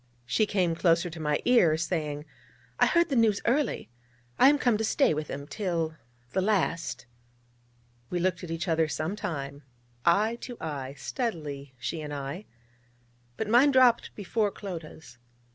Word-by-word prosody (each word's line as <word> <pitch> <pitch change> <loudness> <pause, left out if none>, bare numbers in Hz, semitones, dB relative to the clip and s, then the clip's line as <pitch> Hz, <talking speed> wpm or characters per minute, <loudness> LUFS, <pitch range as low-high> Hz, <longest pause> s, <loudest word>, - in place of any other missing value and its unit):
She 210 - +1
came 185 -5 +1
closer 170 +1 +2
to 165 - -8
my 150 -1 0
ear, 185 -11 +5
saying: 155 -3 -2 0.5
'I - - +6
heard 340 -1 +3
the 275 - 0
news 220 -4 +3
early. 260 - 0 0.5
I 265 - +8
am 290 - +4
come 245 -5 +2
to - - 0
stay 245 - +3
with 155 0 -3
him, 140 +1 -6
till 165 0 -2 0.4
the 190 - +1
last....' 170 - 0 1.0
We 180 - -2
looked 180 +1 0
at 175 - -6
each 165 +2 -3
other 160 -1 +2
some 155 +5 -2
time 140 -8 -5 0.4
eye 210 +7 +3
to 245 -2 -7
eye, 140 -4 -5
steadily, 145 - -4
she 155 +6 -4
and 150 -1 -6
I: 140 +8 -5 0.9
but 220 - -2
mine 245 +6 +6
dropped 255 -3 +4
before 210 +1 0
Clodagh's. 160 - -9
170 Hz, 160 wpm, -28 LUFS, 150-215 Hz, 1.0 s, I